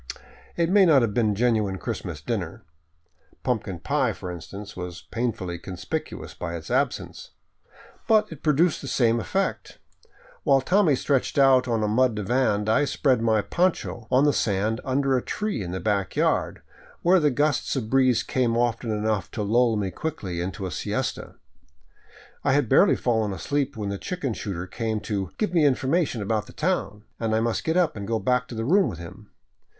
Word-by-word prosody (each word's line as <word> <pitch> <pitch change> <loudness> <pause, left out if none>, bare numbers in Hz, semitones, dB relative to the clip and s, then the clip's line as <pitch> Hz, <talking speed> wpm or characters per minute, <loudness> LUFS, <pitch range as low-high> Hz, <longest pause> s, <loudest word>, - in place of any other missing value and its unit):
It 170 0 +1
may 200 0 +6
not 150 -8 +5
have 110 -3 0
been 115 -1 +2
a - - -5
genuine 110 -4 +1
Christmas 85 - -5
dinner. - - -4 0.8
Pumpkin 105 -7 -2
pie, - - 0
for 90 - -7
instance, 100 +4 -9
was 90 0 -7
painfully 110 -8 -2
conspicuous 90 +1 -5
by 85 -1 -5
its 80 -2 -7
absence. - - -1 0.8
But 215 -2 +3
it 155 -3 -9
produced 155 +3 +2
the 140 - -7
same 120 -3 +2
effect. 100 - -2 0.6
While 135 -1 +3
Tommy 180 0 +3
stretched 135 +1 0
out 130 -2 +5
on 115 -2 0
a - - +1
mud 120 +2 +2
divan, 105 -1 0
I 110 +7 +3
spread 130 -3 +1
my 110 -2 +2
poncho 160 - -1
on 130 +2 +4
the 145 -1 +4
sand 105 +2 0
under 135 0 +1
a 125 - +1
tree 210 - -3
in 90 - -5
the 95 +1 -3
back 100 -3 -1
yard, - - 0 0.4
where 180 +2 +5
the 150 -2 +3
gusts 145 +1 0
of 115 -5 -3
breeze 130 -3 +3
came 120 -3 0
often 120 -1 0
enough 105 -1 -1
to 105 - -2
lull 115 +2 +3
me 100 -2 -2
quickly 95 - -4
into 95 +3 -4
a 95 - -4
siesta. - - -3 1.1
I 140 - +2
had 145 -3 +2
barely 160 - +5
fallen 110 -4 0
asleep 140 +8 -2
when 105 -2 -3
the 100 -1 -4
chicken 175 - -3
shooter 95 -5 -5
came 110 +3 -3
to 100 -4 -3
" - - -42
give 210 -5 -1
me 165 -3 +4
Information 135 - +1
about 105 +1 -1
the - - -13
town," 155 - -2 0.2
and 110 -1 0
I - - +2
must 115 0 -1
get 160 +2 0
up 175 -4 +2
and 100 -2 -6
go 115 0 0
back 125 +4 0
to 120 - -8
the 115 0 -3
room 190 +8 +4
with 85 - -7
him. 90 +5 -11
115 Hz, 185 wpm, -25 LUFS, 105-140 Hz, 1.1 s, may